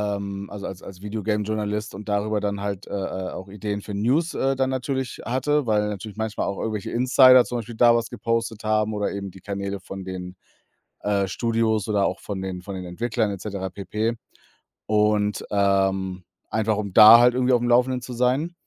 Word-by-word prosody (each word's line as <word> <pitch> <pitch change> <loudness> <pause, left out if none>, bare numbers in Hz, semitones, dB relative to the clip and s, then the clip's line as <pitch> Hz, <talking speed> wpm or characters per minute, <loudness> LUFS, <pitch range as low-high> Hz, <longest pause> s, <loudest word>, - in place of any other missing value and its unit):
ähm, 100 0 -6
also, 100 -1 -7
als 95 0 -8
als 95 -1 -11
Video-Game-Journalist 105 0 -2
und 105 +2 -8
darüber 105 +1 0
dann 100 -1 -2
halt, 100 -1 -4
äh, - - -11
äh, 95 -1 -3
auch 95 +1 -8
Ideen 105 0 -4
für 105 - -8
News, 135 +11 +1
äh, 135 0 +1
dann 130 0 0
natürlich 130 -1 -3
hatte, 135 +4 0
weil 105 -1 +2
natürlich 105 +1 -7
manchmal 110 -1 -2
au 100 - -2
ch - - -5
irgendwelche 110 -3 -3
Insider 130 +1 +6
zum 120 -1 -3
Beispiel 115 +1 -8
da 120 +1 +5
was 115 0 -1
gepostet 115 -2 -2
haben 110 0 +1
oder 105 -1 -1
eben 100 -1 -5
die 95 - -14
Kanäle 100 0 -4
von 95 +1 -8
den, 90 -1 -6 0.7
äh, 100 -2 0
Studios 110 0 0
oder 100 -2 +2
auch 90 - -2
von 100 -2 -5
den 95 -1 -5
von 100 0 -6
den 90 -1 -6
Entwicklern 110 +4 -1
et 95 - -6
cetera 100 -2 -4
pp. 105 +4 -2 0.7
und, 105 -1 +1
ähm, 95 -2 +1 0.3
einfach 110 -1 +1
um 100 -3 -4
da 110 +1 +10
halt 120 0 +5
irgendwie 130 0 +2
aufm 120 0 +2
Laufenden 125 +1 +3
zu 125 0 -7
sein. 130 +8 0
105 Hz, 195 wpm, -24 LUFS, 100-115 Hz, 0.7 s, da